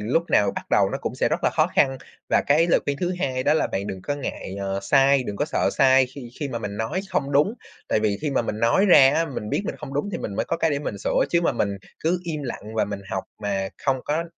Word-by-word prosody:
lúc 125 Hz, +11 st, +1 dB
nào 100 Hz, -1 st, +4 dB
bắt -, -, -5 dB
đầu -, -, +4 dB
nó -, -, -2 dB
cũng -, -, -3 dB
sẽ -, -, +1 dB
rất -, -, -2 dB
là -, -, +4 dB
khó -, -, +2 dB
khăn. 135 Hz, -1 st, +2 dB, 0.3 s
Và -, -, +4 dB
cái 155 Hz, +4 st, +4 dB
lời 175 Hz, -, +3 dB
khuyên 140 Hz, -, -1 dB
thứ 180 Hz, 0 st, 0 dB
hai 130 Hz, -6 st, -1 dB
đó 145 Hz, +3 st, +3 dB
là 160 Hz, -, +2 dB
bạn 100 Hz, +1 st, -3 dB
đừng 95 Hz, -2 st, -6 dB
có 145 Hz, -, -2 dB
ngại, 130 Hz, -8 st, -5 dB
ờ, 95 Hz, 0 st, -2 dB
sai, 135 Hz, +5 st, +4 dB
đừng 100 Hz, -2 st, -5 dB
có -, -, 0 dB
sợ 155 Hz, -, 0 dB
sai 130 Hz, -1 st, +5 dB
khi 125 Hz, -1 st, -10 dB
khi 145 Hz, -, -2 dB
mà 120 Hz, -, -3 dB
mình 105 Hz, -2 st, -5 dB
nói 110 Hz, -, -2 dB
không 140 Hz, 0 st, -1 dB
đúng, 150 Hz, +10 st, +3 dB, 0.3 s
tại -, -, +2 dB
vì 105 Hz, -2 st, 0 dB
khi 150 Hz, -, -1 dB
mà 135 Hz, -, +1 dB
mình 105 Hz, -2 st, -4 dB
nói 155 Hz, -, +3 dB
ra 135 Hz, -7 st, +8 dB
á, 165 Hz, -, +2 dB
mình 125 Hz, -8 st, -6 dB
biết -, -, 0 dB
mình -, -, -4 dB
không 135 Hz, -, -8 dB
đúng 145 Hz, +9 st, -1 dB
thì -, -, -3 dB
mình 100 Hz, -, -5 dB
mới -, -, 0 dB
có -, -, -2 dB
cái 160 Hz, -, +1 dB
để 145 Hz, -, 0 dB
mình 145 Hz, -, -5 dB
sửa, -, -, +1 dB
chứ 170 Hz, -, +3 dB
mà 170 Hz, -, +1 dB
mình 105 Hz, -, 0 dB, 0.3 s
cứ 170 Hz, +3 st, +1 dB
im 155 Hz, -3 st, -4 dB
lặng 110 Hz, -4 st, -6 dB
và 110 Hz, -, +2 dB
mình 100 Hz, -1 st, -5 dB
học 95 Hz, -, -2 dB, 0.2 s
mà 100 Hz, -1 st, -1 dB
không 135 Hz, -2 st, +2 dB
có 160 Hz, +3 st, -1 dB
135 Hz, 290 wpm, -24 LUFS, 105-155 Hz, 0.3 s, ra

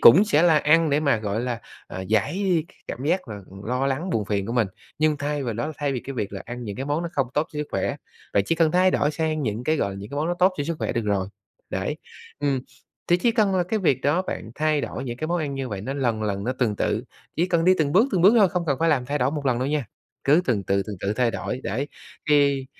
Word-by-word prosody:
cũng 185 Hz, -, +9 dB
sẽ 160 Hz, -6 st, +3 dB
là 165 Hz, -3 st, +6 dB
ăn 155 Hz, +1 st, +4 dB
để 145 Hz, -, +3 dB
mà, 140 Hz, -6 st, +3 dB
gọi 105 Hz, +1 st, -2 dB
là, 120 Hz, -2 st, -3 dB, 0.3 s
à, 95 Hz, -, -6 dB
giải 150 Hz, -, +1 dB, 0.2 s
cảm 130 Hz, -, -5 dB
giác 175 Hz, -3 st, 0 dB
là, 105 Hz, -, -5 dB
ờ, 95 Hz, -, -12 dB
lo 125 Hz, +4 st, 0 dB
lắng, 150 Hz, +7 st, -1 dB
buồn 105 Hz, -8 st, 0 dB
phiền 100 Hz, -1 st, -1 dB
của 115 Hz, -, -3 dB
mình 115 Hz, -4 st, +2 dB, 0.3 s
nhưng 155 Hz, -1 st, +3 dB
thay 145 Hz, 0 st, -2 dB
vào 115 Hz, -4 st, -2 dB
đó, 120 Hz, +8 st, -3 dB
thay 145 Hz, -2 st, -1 dB
vì 125 Hz, -, -2 dB
cái 135 Hz, -, -7 dB
việc 100 Hz, -4 st, -3 dB
là 100 Hz, -, -6 dB
ăn 120 Hz, 0 st, -6 dB
những 100 Hz, -2 st, -5 dB
cái 135 Hz, -, -3 dB
món 150 Hz, +4 st, 0 dB
nó 170 Hz, -, -3 dB
không 135 Hz, -2 st, +1 dB
tốt 150 Hz, +2 st, +1 dB
cho 150 Hz, -, -5 dB
sức 150 Hz, -, -2 dB
khỏe, -, -, -1 dB, 0.4 s
bạn 100 Hz, -, +4 dB
chỉ 165 Hz, -, +2 dB
cần 160 Hz, -1 st, +3 dB
thay 185 Hz, +1 st, +4 dB
đổi 150 Hz, -, +2 dB
sang 155 Hz, -1 st, -1 dB
những 115 Hz, +1 st, -2 dB
cái, 155 Hz, 0 st, +2 dB
gọi 100 Hz, -, 0 dB
là, 95 Hz, -, -7 dB
những 100 Hz, +5 st, -8 dB
cái 140 Hz, -, -5 dB
món 155 Hz, +2 st, 0 dB
nó 175 Hz, -, +1 dB
tốt 185 Hz, +2 st, +4 dB
cho 145 Hz, -, -1 dB
sức 165 Hz, 0 st, -2 dB
khỏe -, -, -1 dB
được 115 Hz, -, -1 dB
rồi, 100 Hz, -2 st, 0 dB, 0.4 s
đấy. -, -, -2 dB, 0.4 s
Ừm, 140 Hz, -3 st, +1 dB, 0.5 s
thì 175 Hz, -, +4 dB
chỉ 230 Hz, +6 st, +2 dB
cần 210 Hz, -4 st, +2 dB
là 180 Hz, -, +3 dB
cái 215 Hz, +5 st, -1 dB
việc 140 Hz, -9 st, +2 dB
đó 150 Hz, +7 st, +2 dB
bạn 110 Hz, -, -5 dB
thay 155 Hz, -1 st, +1 dB
đổi -, -, -4 dB
những 120 Hz, -2 st, -4 dB
cái 155 Hz, -, -3 dB
món 175 Hz, +1 st, 0 dB
ăn 145 Hz, -4 st, -2 dB
như 135 Hz, -2 st, -3 dB
vậy 100 Hz, -3 st, -4 dB
nó 130 Hz, +7 st, -4 dB
lần 120 Hz, -6 st, 0 dB
lần 100 Hz, -1 st, -2 dB
nó 125 Hz, -, 0 dB
tuần 120 Hz, -5 st, 0 dB
tự, 115 Hz, +4 st, 0 dB, 0.3 s
chỉ 170 Hz, +3 st, +2 dB
cần 170 Hz, -2 st, +1 dB
đi 185 Hz, -, +6 dB
từng 145 Hz, -2 st, +1 dB
bước 225 Hz, +8 st, +5 dB
từng 175 Hz, -3 st, +2 dB
bước 205 Hz, +5 st, +7 dB
thôi, 200 Hz, -4 st, +6 dB
không 175 Hz, -1 st, -2 dB
cần 140 Hz, -3 st, +1 dB
phải 165 Hz, -, +3 dB
làm 130 Hz, -6 st, +2 dB
thay 145 Hz, +1 st, -1 dB
đổi 125 Hz, +2 st, +2 dB
một 145 Hz, -2 st, -3 dB
lần 125 Hz, -2 st, +2 dB
đâu 130 Hz, -, -1 dB
nha, 150 Hz, -3 st, 0 dB, 0.4 s
cứ 150 Hz, +6 st, +5 dB
tuần 110 Hz, -, +1 dB
tự 100 Hz, +1 st, +1 dB
tuần 105 Hz, -2 st, -5 dB
tự 100 Hz, -, 0 dB
thay 120 Hz, 0 st, +2 dB
đổi, 130 Hz, +3 st, -4 dB
đấy. 130 Hz, +9 st, -2 dB, 0.4 s
Thì 140 Hz, -2 st, +3 dB
140 Hz, 290 wpm, -24 LUFS, 120-160 Hz, 0.5 s, cũng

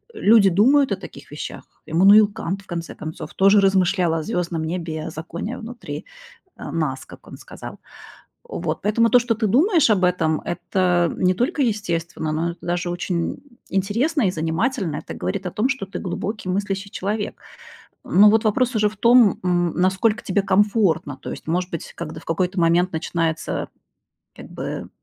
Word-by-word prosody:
Люди 215 Hz, -, +5 dB
думают 260 Hz, +7 st, +4 dB
о -, -, +2 dB
таких 145 Hz, -7 st, -12 dB
вещах. 150 Hz, -, -7 dB, 0.2 s
Эммануил 200 Hz, +6 st, +6 dB
Кант, 195 Hz, +4 st, -4 dB
в 195 Hz, -, -22 dB
конце 170 Hz, -1 st, -6 dB
концов, 155 Hz, 0 st, -8 dB
тоже 195 Hz, +2 st, +5 dB
размышлял 185 Hz, -3 st, +2 dB
о 160 Hz, -1 st, -1 dB
звездном 170 Hz, -5 st, -2 dB
небе, 160 Hz, -2 st, -4 dB
о -, -, -3 dB
законе 170 Hz, +9 st, -6 dB
внутри, 220 Hz, -11 st, -8 dB, 0.5 s
а, -, -, -8 dB
нас, 150 Hz, -5 st, -2 dB
как -, -, -15 dB
он -, -, -10 dB
сказал. -, -, -10 dB, 0.7 s
Вот, 165 Hz, -2 st, -4 dB
поэтому 225 Hz, +2 st, +2 dB
то, 245 Hz, -, +7 dB
что 240 Hz, -1 st, 0 dB
ты 220 Hz, 0 st, -1 dB
думаешь 305 Hz, -, +3 dB
об 185 Hz, -3 st, +3 dB
этом, 165 Hz, -3 st, +1 dB
это 175 Hz, -1 st, 0 dB
не 185 Hz, 0 st, +2 dB
только 250 Hz, -, -1 dB
естественно, 170 Hz, -, -1 dB
но 165 Hz, +2 st, -1 dB
это 170 Hz, -, -16 dB
даже 175 Hz, 0 st, -1 dB
очень 175 Hz, -1 st, -2 dB, 0.3 s
интересно 230 Hz, -, 0 dB
и -, -, +2 dB
занимательно, 170 Hz, -, -1 dB
это -, -, -7 dB
говорит 200 Hz, -1 st, -4 dB
о 180 Hz, -, -2 dB
том, 215 Hz, +7 st, 0 dB
что 270 Hz, -7 st, -2 dB
ты 195 Hz, -, -7 dB
глубокий 200 Hz, +2 st, -4 dB
мыслящий 195 Hz, +1 st, -2 dB
человек. 205 Hz, +2 st, -3 dB, 0.7 s
Но 205 Hz, +3 st, +6 dB
вот 220 Hz, +1 st, +3 dB
вопрос 245 Hz, +4 st, +1 dB
уже 210 Hz, -1 st, +3 dB
в 215 Hz, -, -15 dB
том, 235 Hz, -4 st, +5 dB
м, 175 Hz, -2 st, +1 dB
насколько 195 Hz, +6 st, +1 dB
тебе 200 Hz, +1 st, 0 dB
комфортно, 190 Hz, -, +1 dB
то -, -, -8 dB
есть, -, -, -8 dB
может 175 Hz, +3 st, -1 dB
быть, 165 Hz, -, -6 dB
когд 155 Hz, -, -7 dB
в -, -, -14 dB
какой-то 180 Hz, +2 st, -1 dB
момент 170 Hz, +2 st, +3 dB
начинается, 160 Hz, 0 st, -2 dB, 0.7 s
как -, -, -10 dB
бы, -, -, -5 dB
185 Hz, 175 wpm, -22 LUFS, 170-215 Hz, 0.7 s, то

